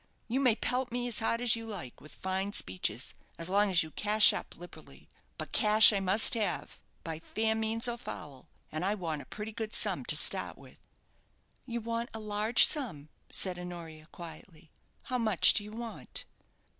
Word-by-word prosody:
You 250 +4 -1
may 250 -5 +3
pelt 250 +1 -2
me 245 0 -2
as 235 - -1
hard 230 +1 0
as 240 -2 +4
you 230 - -7
like 180 - -7
with 150 - -14
fine 190 +2 -3
speeches, 95 - -2 0.2
as 165 +1 -2
long 205 +1 +3
as 175 -3 +3
you 160 - -10
cash 210 +3 +5
up - - -7
liberally; 175 +1 -14 0.3
but - - -7
cash 215 0 +7
I 200 - +1
must 195 +3 +5
have, 220 -3 -2 0.2
by 160 -1 -5
fair 220 +6 -1
means 220 +2 +1
or 240 0 -3
foul, 145 - -9 0.2
and 155 +3 -4
I 200 +3 0
want 165 -6 -4
a - - -13
pretty 210 +1 -7
good 220 0 -5
sum - - +1
to - - +2
start - - 0
with." - - -17 0.9
"You 235 -1 -4
want 230 +1 -4
a - - -5
large 215 +2 +3
sum," 175 - -3 0.2
said 180 -2 0
Honoria, 165 -3 -9
quietly; 165 -1 -12 0.3
"how 250 -1 -3
much 215 -6 +4
do 210 - +1
you 210 - -10
want?" 230 0 -8
210 Hz, 185 wpm, -30 LUFS, 175-230 Hz, 0.9 s, cash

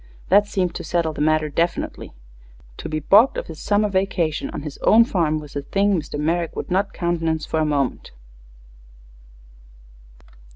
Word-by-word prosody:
That 205 +2 +5
seemed 180 -4 -1
to 175 - -6
settle 165 -1 -1
the 145 - -5
matter 155 0 +2
definitely. 165 - -3 0.6
To - - -6
be 155 0 -2
balked 210 - +5
of - - -3
his 160 -2 -10
summer 210 +1 +1
vacation 185 -5 -1
on - - -6
his 150 -2 -8
own 230 +2 +5
farm 165 -8 0
was 150 -2 -10
a 140 - -2
thing 200 +7 +1
Mr. 150 -4 -3
Merrick 165 +2 -1
would - - -6
not 195 +2 +1
countenance 165 -2 -1
for 160 - -2
a 155 - +2
moment. 140 -4 -1
165 Hz, 165 wpm, -22 LUFS, 155-190 Hz, 0.6 s, That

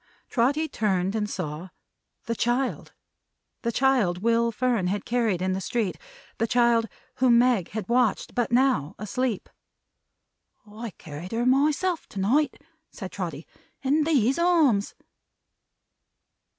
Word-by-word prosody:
Trotty 280 +6 +2
turned, 195 -7 0
and 210 -1 -1
saw 170 -1 -5 0.6
the 230 - -1
child! 240 +3 -1 0.7
The 235 - -1
child 230 -9 +2
Will 230 0 +2
Fern 230 -4 0
had 200 +3 -2
carried 225 -7 0
in 185 0 0
the 190 - -3
street; 220 -1 -2 0.4
the 230 - +1
child 235 -1 +3 0.3
whom 245 -2 +5
Meg 240 -7 +3
had 210 -3 -5
watched, 240 -3 +1
but 240 -1 -1
now, 240 - +2
asleep! 225 +1 -2 1.2
"I 220 +2 -7
carried 160 +5 -8
her 235 +1 0
myself, 300 +7 +2
to 195 - -7
night," 265 +9 +1 0.3
said 190 -4 -8
Trotty. 170 -5 -5 0.4
"In 290 +3 +2
these 275 -3 +2
arms!" 315 - +3
230 Hz, 125 wpm, -26 LUFS, 195-255 Hz, 1.2 s, whom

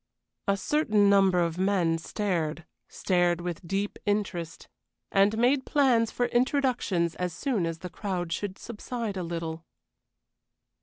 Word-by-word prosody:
A 200 0 +2
certain 210 -4 +2
number 195 -2 +4
of 170 0 -1
men 185 -4 +2
stared 170 -4 -2 0.2
stared 175 -2 +1
with 175 -1 -5
deep 195 +3 -2
interest, 190 -5 -2 0.4
and 200 +2 +3
made 260 +4 +3
plans 255 -7 +3
for 245 - 0
introductions 240 - +1
as 180 -2 -2
soon 210 - -1
as 165 -1 -4
the 180 +2 -7
crowd 180 -4 -3
should 195 0 -4
subside 230 -1 -5
a 185 - -3
little. 165 -1 -4
195 Hz, 135 wpm, -28 LUFS, 170-225 Hz, 0.4 s, number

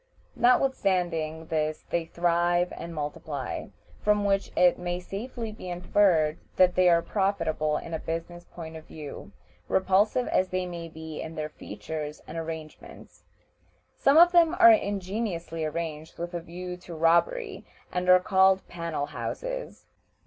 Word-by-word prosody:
Notwithstanding 185 - +1
this 155 -1 -2
they 170 -1 0
thrive 175 +1 +1
and 170 - -7
multiply, 145 -3 -4 0.3
from 210 -1 +2
which 195 0 +1
it 180 0 +4
may 175 0 -2
safely 225 +5 -6
be 195 -4 -9
inferred 175 -3 +2 0.2
that 180 -1 +5
they 185 0 +4
are 170 -1 +4
profitable 165 -7 0
in 165 - -7
a 160 - -1
business 165 +1 -5
point 160 -2 -9
of 160 0 -10
view, 150 -2 -9 0.4
repulsive 200 +6 +2
as 185 0 +2
they 185 0 -1
may 170 -2 -6
be 160 -1 -8
in 160 0 -7
their 155 -1 -3
features 150 +6 -7
and 155 - -9
arrangements. 160 -1 -8 0.7
Some 275 +3 +4
of 345 +1 +8
them 345 -1 +5
are 345 -2 +9
ingeniously 195 - -1
arranged 155 0 -4
with 175 +1 -5
a 175 - -3
view 180 +2 -7
to 175 -1 -10
robbery, 285 - +2 0.3
and 180 0 -1
are 185 0 +8
called 190 0 +3
"panel 170 -4 -3
houses." - - -5
175 Hz, 145 wpm, -27 LUFS, 160-195 Hz, 0.7 s, are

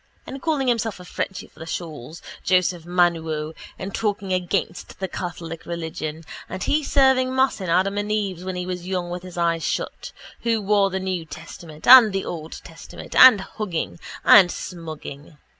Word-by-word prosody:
And 270 0 -8
calling 295 -4 0
himself 225 -4 0
a 180 - -11
Frenchy 190 +2 -4
for - - -22
the 160 - -8
shawls, 160 -2 -7 0.2
Joseph 180 -2 +1
Manuo, 165 -3 0 0.2
and 195 +1 -6
talking 200 -3 -1
against 180 -1 -2
the 190 - -2
Catholic 165 -2 -6
religion, 160 -2 -5 0.3
and 185 +1 -5
he 305 +1 +1
serving 265 -2 +3
mass 260 -5 +2
in 185 - -4
Adam 195 +4 +2
and 205 +1 -3
Eve's 195 -5 -2
when 185 0 -4
he 180 0 -3
was 180 -1 -5
young 180 -2 -2
with 180 0 -4
his 180 -1 -11
eyes 170 -1 +1
shut, - - -3 0.3
who 225 -3 0
wrote 200 -1 +3
the 190 - -1
new 185 -2 -3
testament, 160 0 -11
and 240 -5 +9
the 195 - -2
old 160 -2 -6
testament, 165 -1 -11
and 255 -6 +9
hugging 190 -5 -4 0.3
and 185 -3 +8
smugging. 155 -3 -8
180 Hz, 175 wpm, -23 LUFS, 165-205 Hz, 0.3 s, and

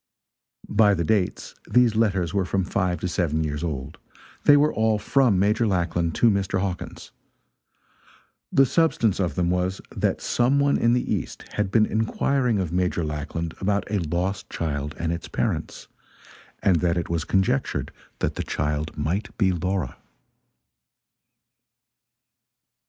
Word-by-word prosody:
By 105 -1 +4
the 85 - -1
dates, 95 +1 -1 0.2
these 125 -3 +4
letters 95 -6 +1
were 100 - +1
from 95 +1 0
five 90 -1 -1
to 90 - -1
seven 80 -3 0
years 75 0 -3
old. 75 -3 -5 0.5
They 145 - +8
were 150 +1 +3
all 110 -1 +2
from 115 0 +2
Major 105 +4 +2
Lackland 85 -3 0
to 115 - +4
Mr. 95 -1 0
Hawkins. 95 -2 -5 1.4
The 135 - +5
substance 125 - +2
of 90 -6 -1
them 90 -1 +1
was, 90 +1 -1 0.2
that - - 0
some 125 +4 +1
one 140 0 +2
in 115 0 +3
the 125 - 0
east - - -4
had 105 -2 -1
been 110 +2 +4
inquiring 115 +2 0
of 90 -4 -2
Major 90 -1 0
Lackland 75 +2 -4
about 100 +1 +1
a 105 - +1
lost 90 +4 -2
child 75 -2 -3
and 85 0 -1
its 85 - -6
parents, - - -3 0.8
and 90 -3 +4
that 85 0 +1
it 85 - -2
was 85 -2 -1
conjectured 95 -8 0 0.3
that - - -1
the - - -3
child 75 +2 -2
might 85 +8 -2
be 95 -4 +3
Laura. 90 -4 -2
95 Hz, 145 wpm, -24 LUFS, 85-105 Hz, 1.4 s, They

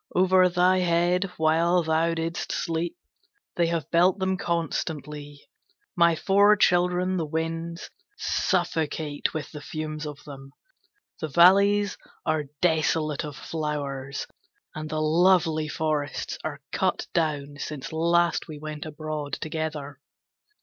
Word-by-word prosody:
Over 185 0 +5
thy 180 +1 +3
head 175 +1 +2
while 165 +3 +3
thou 160 +1 +1
didst 165 +1 -3
sleep 165 +1 -2 0.6
they 170 - +2
have 165 -3 -2
built 175 +3 +4
them 190 -1 0
constantly. 150 -4 -4 0.5
My 170 -1 +4
four 200 +5 +5
children 180 -1 +2
the 165 - -1
Winds 165 +2 -4 0.3
suffocate 160 -5 -1
with 155 -3 -4
the 150 - -8
fumes 155 0 -5
of 145 -1 -7
them, 135 -1 -11 0.7
the 155 - -3
valleys 200 +5 +5 0.3
are 155 -1 0 0.2
desolate 160 -2 +1
of 150 -2 -6
flowers, 140 -3 -4 0.5
and 155 0 -6
the 155 - -2
lovely 160 -1 +3
forests 150 -2 -2
are - - -5
cut - - 0
down 145 -4 -1
since 145 -1 -6
last 170 +1 +2
we 155 -2 -8
went 155 0 -6
abroad 155 -1 -5
together.' 155 -3 -4
160 Hz, 120 wpm, -26 LUFS, 150-175 Hz, 0.7 s, Over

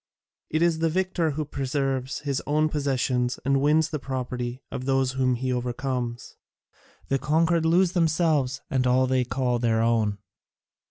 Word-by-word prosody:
It 155 +2 +1
is 170 -2 +2
the 165 0 +2
victor 180 -1 0
who 155 - -1
preserves 135 -1 -2
his 140 -2 -2
own 155 +1 +2
possessions 130 -4 0
and 135 0 +2
wins 155 +2 +3
the 150 - -2
property 125 -1 -4
of 130 - -5
those 135 -1 +1
whom 130 -1 +1
he 130 +1 -2
overcomes: 125 -1 -3 0.7
the 135 - +1
conquered 160 +2 +2
lose 175 +2 +3
themselves 160 -6 +1
and 130 -1 +1
all 130 +1 +3
they 130 0 +1
call 125 0 -1
their 115 -1 +1
own." 110 -3 +1
135 Hz, 155 wpm, -25 LUFS, 125-155 Hz, 0.7 s, wins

